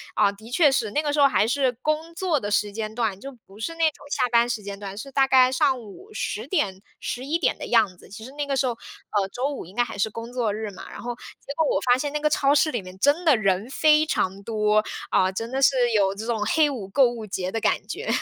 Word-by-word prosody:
啊， 205 -1 +4
的 220 +3 -14
确 290 +3 +4
是， 235 -5 0
那 295 +9 -1
个 290 -1 -1
时 295 - 0
候 280 - +8
还 220 -5 +2
是 260 +1 +1
工 315 +2 -1
作 340 -4 0
的 205 - -4
时 205 0 +1
间 215 0 -5
段， 220 -5 -1
就 275 - -7
不 195 +2 -16
是 330 +9 -4
那 330 0 +2
种 - - -18
下 - - +1
班 235 0 +4
时 225 -3 -3
间 200 0 -7
段， 200 -1 -7
是 275 +6 -7
大 270 0 +3
概 255 -1 +5
上 265 -1 +2
午 235 - -13
10 425 - -4
点、 195 - -1 0.2
11 275 +7 -2
点 340 - +1
的 - - -5
样 220 -6 +3
子。 - - -16
其 220 +3 -10
实 260 - -10
那 290 0 -4
个 275 -1 -1
时 265 - +2
候， 250 - +1 0.4
呃， 200 -2 +1
周 255 +3 -1
5 - - -6
应 185 - -15
该 240 - +3
还 240 - -7
是 200 +2 +1
工 230 +2 -8
作 240 -4 0
日 215 0 -4
嘛， 190 - -10
然 - - -9
后 245 0 -4 0.3
结 280 - -5
果 320 - +3
我 - - +2
发 245 0 +3
现 285 +2 -3
那 300 - -1
个 300 0 +2
超 280 -1 +3
市 310 +1 +3
里 240 -6 -2
面 185 0 -12
真 290 - +2
的 305 -5 +6
人 195 -1 0
非 305 +2 +4
常 195 -10 -1
多， 215 -1 +2 0.3
啊， 185 - +3
真 225 +5 -5
的 265 +1 -1
是 260 -3 +4
有 195 -2 +3
这 215 +2 -6
种 230 -2 -1
黑 305 +7 +3
五 235 -9 -5
购 255 +5 +4
物 235 -2 -6
节 185 -1 -3
的 225 - -2
感 - - 0
觉。 - - -6
240 Hz, 285 characters per minute, -24 LUFS, 210-280 Hz, 0.4 s, 候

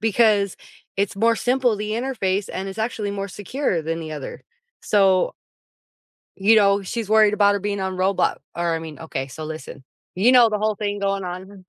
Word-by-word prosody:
because 215 -3 +2 0.4
it's 200 0 -1
more 230 +3 +3
simple, 250 -2 +1
the 210 +1 -4
interface, 215 -5 -1
and 190 +1 -4
it's 195 +3 -8
actually 220 -2 -2
more 200 0 -4
secure 205 - -2
than 165 +1 -3
the 155 -1 -6
other, 145 -3 -7 0.4
so" 195 -3 +3 1.0
you 210 +3 +4
know, 200 -1 +4
she's 215 +2 -4
worried 215 -1 +5
about 205 -1 +4
her 200 - -2
being 205 0 -2
on 190 0 -2
Roblo 190 +1 +1 0.2
or 170 -1 0
I - - -1
mean, 160 -2 -9
OK, 135 -4 -5
so 145 +5 -8
listen, 155 -3 -8 0.3
you 215 +8 +4
know 245 -2 +7
the 210 -1 -1
whole 215 0 0
thing 205 0 -3
going 195 -1 -1
on. 185 +2 -8
200 Hz, 190 wpm, -22 LUFS, 185-215 Hz, 1.0 s, know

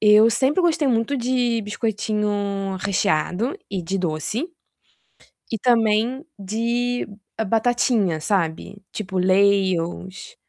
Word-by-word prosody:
Eu 215 +1 +7
sempre 265 - +2
gostei 320 -4 +2
muito 235 +4 +1
de 245 -2 0
biscoitinho 205 -2 -2
recheado 190 - 0
e 190 -3 -3
de 190 +4 -2
doce, 180 - -2 1.0
e 225 - -1
também 230 - +2
de 235 +5 -1 0.4
batatinha 225 -7 +1
sabe. 195 +2 -2
Tipo, 190 -3 -4
Lays 190 0 +3
ou 170 +2 -4
s 445 - -11
210 Hz, 110 wpm, -22 LUFS, 190-240 Hz, 1.0 s, Eu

